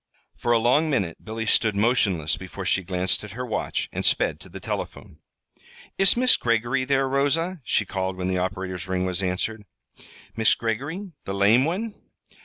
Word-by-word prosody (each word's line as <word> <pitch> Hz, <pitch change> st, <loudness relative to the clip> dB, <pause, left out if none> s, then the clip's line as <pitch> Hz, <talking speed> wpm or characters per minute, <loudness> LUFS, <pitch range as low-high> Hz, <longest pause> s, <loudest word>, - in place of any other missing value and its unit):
For 120 Hz, -, -1 dB
a 120 Hz, -, +6 dB
long 130 Hz, +8 st, +3 dB
minute 100 Hz, -, -1 dB
Billy 110 Hz, 0 st, -4 dB
stood 110 Hz, -1 st, +3 dB
motionless 100 Hz, -, +2 dB
before -, -, -8 dB
she 95 Hz, -, +2 dB
glanced 90 Hz, +2 st, -1 dB
at 105 Hz, -2 st, -9 dB
her 125 Hz, -, -3 dB
watch 115 Hz, -, -2 dB
and -, -, -3 dB
sped -, -, +2 dB
to -, -, -11 dB
the -, -, -8 dB
telephone. -, -, -6 dB, 0.8 s
"Is 195 Hz, +3 st, +4 dB
Miss 250 Hz, +1 st, +5 dB
Greggory 120 Hz, +3 st, +1 dB
there, 135 Hz, 0 st, +2 dB
Rosa?" 150 Hz, +6 st, 0 dB
she 105 Hz, -, +1 dB
called 95 Hz, -1 st, -3 dB
when 90 Hz, 0 st, -2 dB
the 95 Hz, -1 st, 0 dB
operator's 95 Hz, -1 st, -3 dB
ring 95 Hz, 0 st, -1 dB
was 90 Hz, 0 st, -2 dB
answered. 95 Hz, +4 st, -2 dB, 0.7 s
"Mis' 110 Hz, -2 st, +4 dB
Greggory, 140 Hz, -, -3 dB
the 95 Hz, -, -3 dB
lame 105 Hz, +7 st, +5 dB
one?" 205 Hz, +7 st, -2 dB
110 Hz, 175 wpm, -25 LUFS, 95-135 Hz, 0.8 s, a